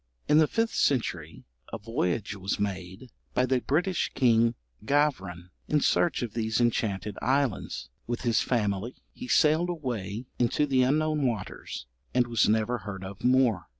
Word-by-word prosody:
In 150 - +5
the 155 - +5
fifth 225 +5 0
century 90 - -1 0.3
a - - -3
voyage 105 -2 -2
was 100 +1 -3
made, 100 +4 -4 0.2
by 125 - +3
the 130 -1 +1
British 175 +7 0
king 115 -2 +3 0.3
Gavran, 100 - 0 0.2
in 150 - +2
search 145 -1 +2
of 115 -3 -5
these 110 -1 -1
enchanted 105 -4 0
islands; 135 -4 -1 0.2
with 120 0 -3
his 120 -2 +2
family 105 -1 -1 0.2
he 250 - -8
sailed 160 -1 +3
away 120 - -4
into 125 +4 +2
the 135 -3 +2
unknown 150 +2 +2
waters, 105 - -5 0.3
and 125 -1 +4
was 115 -3 +2
never 110 +3 +1
heard 95 -1 -7
of 95 0 -9
more. 125 -8 +3
120 Hz, 150 wpm, -28 LUFS, 100-135 Hz, 0.3 s, In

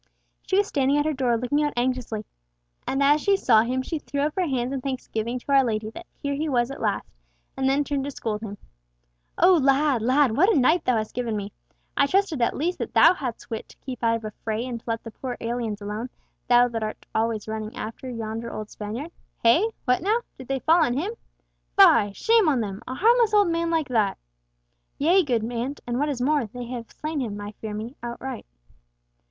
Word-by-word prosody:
She 380 - 0
was 410 - +4
standing 275 -4 +1
at 295 - +1
her 310 - +1
door 250 -4 +1
looking 250 +5 0
out 295 -1 0
anxiously, 240 -4 -1 0.6
and 270 +1 +1
as 295 +2 +4
she 400 -1 +3
saw 225 - +5
him 255 +3 -1
she 320 +3 -3
threw 285 -1 -3
up 300 +1 0
her 370 -2 +1
hands 255 -2 -1
in 270 - -3
thanksgiving 250 -3 -3
to 265 +3 -6
our 275 -1 +6
Lady 215 -2 -2
that 340 +7 -10
here 280 -1 -2
he 305 +3 -2
was 245 -1 +1
at 275 - -8
last, 210 -2 -1 0.5
and 265 0 +1
then 280 +2 +2
turned 280 -1 -2
to - - -3
scold 220 -6 -4
him. 205 -2 -6 0.8
"O 360 +2 +6
lad, 275 -3 +3
lad, 255 0 +3
what 375 - +5
a - - +3
night 315 +7 +3
thou 250 -2 +3
hast 215 -1 -3
given 235 -3 -2
me! 200 0 -6 0.4
I 280 - +4
trusted 370 -5 +1
at 235 - +1
least 345 +5 -1
that - - -5
thou - - +8
hadst 255 -7 -6
wit 225 - -5
to - - -17
keep 255 -3 -8
out 230 0 +3
of 225 -1 -5
a 215 - -4
fray 220 +2 -2
and 245 -2 -4
to - - -30
let 230 -1 -2
the 225 - -8
poor 250 +2 -6
aliens 230 -3 -3
alone, 210 +4 -4 0.4
thou 245 0 +6
that 230 -2 -4
art 215 0 -5
always 220 -1 -1
running 220 0 -5
after 225 +4 -6
yonder 230 -1 -5
old 215 -1 -6
Spaniard. 230 +10 -6 0.3
Hey! 320 - +5 0.2
what 250 0 +2
now? 430 +6 +1
Did 260 - -11
they 270 -1 -2
fall 330 +1 +5
on 245 -5 +1
him! 385 +10 -2 0.6
Fie! 205 0 +7
Shame 445 - +3
on 270 -4 +2
them!—a 215 +5 -5
harmless 455 - +4
old 410 -3 +5
man 335 0 0
like 320 -4 0
that." 215 -5 +1 0.8
"Yea, 345 +6 +4
good 245 -9 0
aunt, 250 +5 -3
and 240 +1 -2
what 295 +1 +1
is 265 -4 -3
more, 290 -3 +2
they 245 +3 -7
have 240 -1 -6
slain 310 0 -4
him, 215 -6 -3
I 205 0 -6
fear 215 -1 -4
me, 225 +5 -6
outright." 240 - -6
255 Hz, 220 wpm, -25 LUFS, 225-295 Hz, 0.8 s, thou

